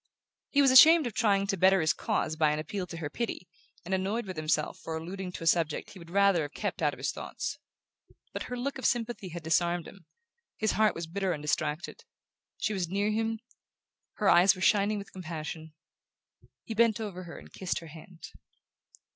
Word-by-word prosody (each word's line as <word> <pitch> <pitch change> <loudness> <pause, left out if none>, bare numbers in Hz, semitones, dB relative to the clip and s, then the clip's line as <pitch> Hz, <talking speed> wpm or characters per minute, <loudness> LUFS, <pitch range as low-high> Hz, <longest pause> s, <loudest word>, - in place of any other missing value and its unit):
He 285 0 +4
was 270 - +5
ashamed 315 +4 +8
of 240 - -3
trying 200 -3 +2
to 200 0 -1
better 190 +1 +4
his 155 -2 +2
case 155 - -1
by 155 -1 +3
an 150 - -1
appeal 180 +5 -4
to 170 - -8
her 155 -3 -4
pity, 230 -4 -4 0.4
and 185 - -3
annoyed 195 +5 -1
with 185 -1 -6
himself 155 0 -1
for 160 0 -5
alluding 180 +3 -6
to 165 - -7
a - - -5
subject 165 -2 +1
he 190 - -12
would 170 -1 -13
rather 200 -2 +3
have 145 -1 -5
kept - - -3
out - - +3
of - - -10
his - - -2
thoughts. - - -5 0.7
But - - -4
her 250 - -4
look 270 +2 -3
of - - -5
sympathy 235 -5 -2
had 170 0 -7
disarmed 170 +1 +1
him; 190 -5 -15 0.5
his 220 -1 +1
heart 215 0 +2
was 170 - -4
bitter 190 +2 -2
and 150 - -6
distracted; 150 +2 -2 0.5
she 215 - -1
was 180 -4 -2
near 200 +3 0
him, 225 +1 -1 0.7
her 210 - -1
eyes 185 +2 +6
were 185 - -9
shining 205 +2 +3
with 200 -1 -9
compassion 160 -3 -7 0.9
he 225 - -5
bent 230 0 +3
over 190 -4 -6
her 170 - -9
and - - -14
kissed 185 -1 -3
her 170 - -6
hand. 165 +2 -12
185 Hz, 205 wpm, -29 LUFS, 165-210 Hz, 0.9 s, ashamed